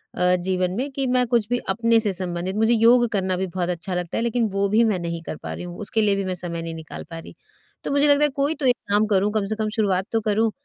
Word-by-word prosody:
अ, 180 0 +3
जीवन 180 0 -1
में 275 +3 -2
कि 270 0 -2
मैं 250 0 +2
कुछ 235 -3 +1
भी 245 - +1
अपने 230 +3 +3
से 210 -3 -1
संबंधित 180 +1 -2
मुझे 225 +2 +3
योग 235 +2 +5
करना 190 -3 0
भी 190 - -2
बहुत 175 0 -3
अच्छा 180 +2 -4
लगता 175 -1 -3
है - - 0
लेकिन 235 -1 +1
वो 200 0 +1
भी 220 +3 +4
मैं 210 -5 +1
नहीं 170 -1 -4
कर 155 - -6
पा - - -7
रही - - -7
हूँ, 175 0 -8
उसके 220 +1 -1
लिए 205 -2 +3
भी 195 - -2
मैं 185 -1 -2
समय 170 -1 -5
नहीं 165 0 -5
निकाल 160 -1 -8
पा 165 - -7
रही। - - -12 0.5
तो - - -3
मुझे 285 +1 +3
लगता 285 0 +4
है 295 - +4
कोई 285 +3 -1
तो 280 - -4
एक 245 - +4
काम 205 +1 +3
करूँ, 205 0 +2
कम 215 -2 0
से 215 +2 -2
कम 215 -1 -2
शुरुआत 195 -3 +1
तो 225 -1 +1
करूँ 215 +1 +1
205 Hz, 285 wpm, -23 LUFS, 180-230 Hz, 0.5 s, योग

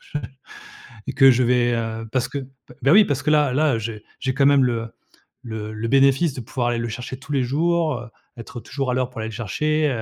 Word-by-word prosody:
je 150 - +1 0.9
et - - -3
que 135 0 +7
je 125 +1 +2
vais 120 0 +2
heu, 115 -1 -3
parce 130 -2 0
que 140 - -4
p 130 -1 -14
bah, 135 - +3
oui, 205 +3 +7
parce 145 -1 -1
que - - 0
là 150 -4 +3
là, 145 -1 +2
heu, - - -2
j'ai 110 -1 -6 0.2
j'ai 130 -1 -1
quand 135 0 +2
même 140 -1 +5
le 115 -2 -2 0.5
le 110 -2 -6
le 110 +2 -4
bénéfice 135 +3 +3
de 130 - -6
pouvoir 120 +1 -2
aller 120 - -1
le 115 0 -3
chercher 125 +3 -6
tous 140 +3 -11
les 135 -2 +2
jours, 160 +3 +1
heu, 120 0 -10 0.3
être 115 +1 -8
toujours 135 -3 -3
à - - 0
l'heure 130 -1 0
pour 115 - -9
aller 110 - -3
le 110 - -9
chercher, 150 +8 0
130 Hz, 245 wpm, -22 LUFS, 115-140 Hz, 0.9 s, que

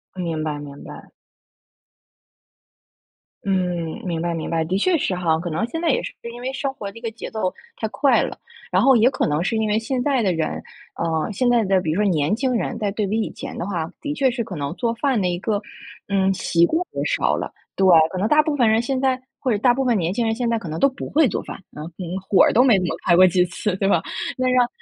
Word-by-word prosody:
明 165 -4 -3
白 150 -2 -2
明 145 -1 -10
白。 - - -11 2.4
嗯， 195 - +1 0.5
明 165 -2 -2
白 170 0 -1
明 165 - -4
白， 165 -1 0
的 185 +4 -1
确 345 - +2
是 190 -9 -1
哈。 165 -3 +1
可 175 0 -4
能 165 +9 -1
现 325 - -4
在 335 - +1
也 - - +2
是 - - -6 0.2
因 240 - -9
为 260 +1 -3
生 270 0 -2
活 200 -6 -7
的 230 - -14
一 - - -11
个 230 -2 -3
节 230 - -8
奏 200 -4 -2 0.2
太 220 - -2
快 275 +4 +3
了， - - -5 0.3
然 - - +3
后 270 -2 +6
也 235 +3 +5
可 - - -1
能 150 +3 0
是 225 - -1
因 220 -1 +1
为 210 - +2
现 250 +2 -2
在 275 -4 +2
的 185 -3 +2
人， 160 -1 -2 0.3
啊， 165 +3 -1
现 245 +5 0
在 235 -2 +4
的 190 -1 +2
比 160 -3 -2
如 195 +6 0
说 205 - +3
年 155 +3 +1
轻 260 +1 0
人， 230 +1 -2
在 205 -2 0
对 210 0 -1
比 220 +3 0
以 - - -3
前 270 -1 -8
的 - - -3
话， 170 -3 -3
的 290 0 -3
确 275 -3 +2
是 235 -1 -2
可 185 - -7
能 145 +2 -3
做 235 -2 -1
饭 260 -4 +1
的 180 - +1
一 175 0 -1
个， 205 0 -1 0.5
嗯， 195 -1 +2
习 170 -2 +2
惯 325 - 0
也 - - -2
少 - - +1
了。 - - -4 0.2
对， 190 - +2 0.3
可 185 - -4
能 200 +4 +1
大 300 +3 +5
部 305 -1 -1
分 245 -5 +3
人 220 +1 +3
现 260 +1 -1
在 260 -1 +1 0.2
或 255 - 0
者 210 - +2
大 245 +2 +4
部 265 +2 0
分 240 -2 +3
年 170 -1 0
轻 230 +3 -1
人 225 - +1
现 240 0 -1
在 230 - +1
可 185 - -7
能 160 +1 -4
都 275 - +5
不 265 - -7
会 305 -2 +4
做 195 - -2
饭。 - - -7 0.2
啊， 150 - -7 0.2
嗯， 180 +1 -4
火 195 - +5
儿 - - +4
都 245 - +5
没 245 -6 +5
怎 180 - -1
么 - - -2
开 170 - +5
过 185 +1 +8
几 180 0 +3
次 185 +2 -3
对 195 - 0
吧？ - - +3 0.3
那 255 0 0
让 250 -1 +4
210 Hz, 285 characters per minute, -22 LUFS, 175-250 Hz, 2.4 s, 过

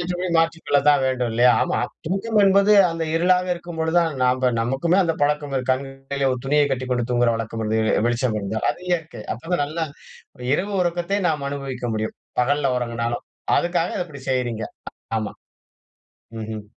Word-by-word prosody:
ஏற்றபடி 180 +1 -2
மாற்றிக்கொள்ள 165 -3 +2
தான் 145 -1 +5
வேண்டும் 125 -2 0
இல்லையா? 125 +2 +5
ஆமா. - - 0 0.3
தூக்கம் 205 +5 0
என்பது 200 +1 +5 0.2
அந்த 165 0 -2
இருளாக 180 +2 +3
இருக்கும் 175 -1 -9
பொழுது 160 +2 0
தான் 165 -2 +2
நம்ப 125 0 +3
நமக்குமே 135 +10 +1
அந்த 165 -2 0
பழக்கம் 145 -1 0
இருக்கு 130 0 -1
கண்கள்ல 135 +1 -3
ஒரு 125 - -3
துணியை 145 +1 +3
கட்டிக்கொண்டு 125 -2 -1
தூங்குகிற 120 -1 +3
வழக்கம். 115 0 -4 0.4
வெளிச்சம் 120 -2 0
இருந்தா. 105 +2 -3
அது - - -7
இயற்கை. 160 -10 -2
அப்பதான் 165 +6 -2
நல்ல 160 +3 -3 0.7
இரவு 200 +7 0
உறக்கத்தை 175 +3 -1
நாம் 150 -3 -1
அனுபவிக்க 135 -3 -4
முடியும். 110 0 -3 0.2
பகல்ல 135 +1 +1
உறங்கினாலும் 115 -1 -2 0.3
அதுக்காக 175 0 +1
இத - - -1
இப்படி 140 -4 -11
செய்றீங்க. 120 -4 -1 0.5
ஆமா. 110 -1 -4 1.1
ம்ஹ்ம் 110 -1 -6
140 Hz, 155 wpm, -22 LUFS, 125-170 Hz, 1.1 s, தான்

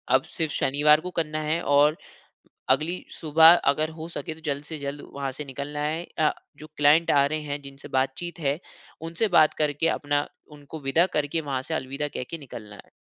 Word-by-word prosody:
अब 130 - +3
सिर्फ़ 160 -3 -1
शनिवार 150 +3 +4
को 180 - -6
करना 155 -2 -2
हैं 155 +3 -1
और, 145 +2 +4 0.7
अगली 155 +7 +1
सुबह 160 +2 +6 0.2
अगर 155 +2 -1
हो 160 +1 -6
सके 165 -1 -5
तो 160 - -16
जल्द 145 0 -2
से 160 -2 -5
जल्द 140 +1 -5
वहाँ 140 -1 -3
से 150 +2 -6
निकलना 140 +2 -6
है 155 +3 -1 0.2
अ, 155 - +4 0.3
जो 155 - -11
क्लाइंट 150 +3 +5
आ 140 -1 +5
रहे 155 +2 -1
हैं, 145 -1 -4
जिनसे 140 0 -11
बात-चीत 150 +7 -2
है, 145 +1 0 0.5
उनसे 210 +7 0
बात 155 -1 +6
करके 150 +2 0
अपना 145 0 0 0.3
उनको 145 +2 -10
विदा 150 +6 +3
करके 150 +2 0
वहाँ 135 -3 -2
से - - +1
अलविदा 140 +3 -3
कहके 145 +6 -4
निकलना 110 -7 -10
है। - - -27
150 Hz, 195 wpm, -25 LUFS, 140-160 Hz, 0.7 s, सुबह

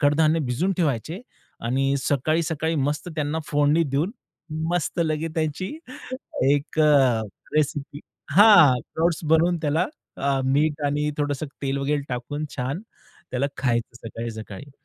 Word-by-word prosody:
कडधान्य 155 +2 +3
भिजून 175 +11 +1
ठेवायचे 155 - -1 0.4
आणि 135 +4 +1
सकाळी, 150 +5 +1
सकाळी 160 +1 -1
मस्त 145 +4 -1
त्यांना 150 +1 -1
फोडणी 145 +2 +3
देऊन, 145 +6 0 0.6
मस्त 175 0 -1
लगेच 160 0 -1
त्याची 160 +3 -1 0.8
एक 145 +2 0
अ, 135 -7 +4 0.3
रेसिपी 145 -1 -1 0.3
हां, 180 - +8
स्प्राउट 165 +7 0 0.2
बनवून 170 +2 +4
त्याला 155 +4 +1 0.3
अ, 140 -1 0
मीठ 145 +3 +1
आणि 150 +1 0
थोडंसं 145 0 -1 0.2
तेल 135 0 -1
वगैरे 145 +1 0
टाकून 130 +5 -4
छान 135 +8 -3 0.5
त्याला 130 +2 0
खायचं 120 -3 -1
सकाळी, 115 +1 -5
सकाळी. 110 +4 -9
145 Hz, 130 wpm, -24 LUFS, 135-160 Hz, 0.8 s, हां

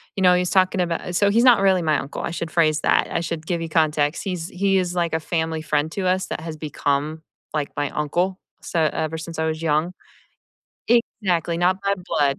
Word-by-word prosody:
you 195 - -2
know, 180 0 +6
he's 180 0 0
talking 185 0 +3
about 175 +1 -2
so 200 +2 +3
he's 230 +3 +3
not 240 -5 +6
really 190 -2 +4
my 155 -2 +2
uncle 140 - -5
I - - -3
should 170 -1 -4
phrase 155 -3 +2
that - - +2
I 165 - 0
should 165 -1 -4
give 170 -2 -1
you 165 - -4
context. 155 -1 +1
He's 180 -4 -3
He 195 +1 +1
is 180 -1 0
like 170 -2 0
a 160 - +1
family 160 -1 -2
friend 150 0 0
to 200 - -3
us 185 +1 +1
that - - -4
has 160 -1 -6
become 150 +1 -2 0.3
like 150 -2 -2
my 145 -1 0
uncle, 175 +5 -1 0.2
so 160 -2 0
ever 160 +1 -2
since 160 0 -7
I 160 - +1
was 160 0 -3
young. 160 +2 +1 1.3
Exactly, 170 -3 0
not 185 +2 +2
by 200 0 +1
blood 140 -6 +1
165 Hz, 220 wpm, -22 LUFS, 155-180 Hz, 1.3 s, know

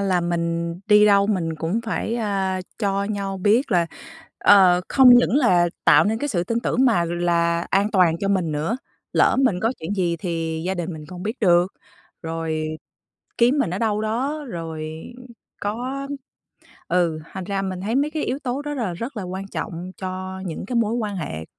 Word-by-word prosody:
là 190 -3 +1
mình 170 -1 -1
đi 210 0 +6
đâu 200 -1 +5
mình 175 -6 -1
cũng 170 +9 -1
phải, 225 +1 -2
à, 195 -4 -1 0.2
cho 200 -2 0
nhau 200 -2 -3
biết 215 +8 +2
là 170 -2 +3 0.5
ờ, 185 -3 +6
không 265 -2 +6
những 245 +1 +4
là 180 -11 +4 0.2
tạo 150 +2 +6
nên 220 +2 0
cái 290 - -2
sự 175 -8 -1
tin 230 +5 -1
tưởng 255 +2 +1
mà 220 -9 +3
là 170 0 0
an 200 +2 +2
toàn 175 -4 +3
cho 195 - -1
mình 180 -6 +1
nữa, 155 +10 -1 0.4
lỡ - - +4
mình 195 -8 +1
có 225 +4 +1
chuyện 165 +6 -3
gì 175 -3 0
thì 165 -2 -3
gia 190 - 0
đình 175 0 -4
mình 155 -1 -9
không 180 +1 -9
biết 220 +6 -4
được, 175 -1 +3 0.5
rồi 160 -1 -3 0.7
kiếm 245 +5 +4
mình 275 - +1
ở 180 - -3
đâu 215 -2 0
đó, 260 +8 -2
rồi 160 -5 -5 0.7
có 255 +7 -3 0.8
ừ, 170 -3 +1
thành 190 -1 -5
ra 195 0 -2
mình 185 -1 -4
thấy 215 +4 -2
mấy 290 +2 +1
cái 310 -1 -2
yếu 260 - -2
tố 275 0 -3
đó 295 0 -4
là 225 -9 -2
rất 235 +8 -6
là 210 - -3
quan 190 +2 -5
trọng 180 -3 -5
cho 185 0 -5
những 165 - -5
cái 245 - -3
mối 225 -1 +1
quan 215 -4 -2
hệ 80 - -5
190 Hz, 195 wpm, -22 LUFS, 170-225 Hz, 0.8 s, đi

